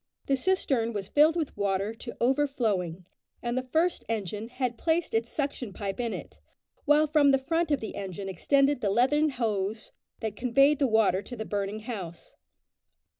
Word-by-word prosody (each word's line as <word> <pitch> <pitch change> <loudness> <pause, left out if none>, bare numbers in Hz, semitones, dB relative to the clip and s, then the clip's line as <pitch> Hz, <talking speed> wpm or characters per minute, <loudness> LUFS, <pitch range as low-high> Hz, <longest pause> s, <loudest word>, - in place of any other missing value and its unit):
The 275 - +2
cistern 265 -8 0
was 200 -1 -4
filled 305 +3 +5
with 320 -4 -2
water 200 +1 -1
to 235 +1 -9
overflowing, 230 - 0 0.4
and 240 0 -1
the 255 - +1
first 320 +8 0
engine 210 0 -3
had 250 0 -2
placed 325 +6 0
its 225 +1 0
suction 275 -7 -3
pipe 195 0 -4
in 235 -2 -1
it, - - -8 0.5
while 295 +1 +5
from 300 -2 +4
the 270 - +5
front 325 +5 -1
of 290 -3 +1
the 220 - -5
engine 195 -1 -5
extended 275 - +2
the 205 - +1
leathern 265 +9 +3
hose 220 -5 -2 0.3
that 220 -1 -3
conveyed 275 +4 +3
the 275 - +3
water 220 -4 +3
to 245 +5 -9
the 220 -1 -5
burning 205 +1 -3
house. 190 -8 -7
240 Hz, 175 wpm, -28 LUFS, 205-280 Hz, 0.5 s, filled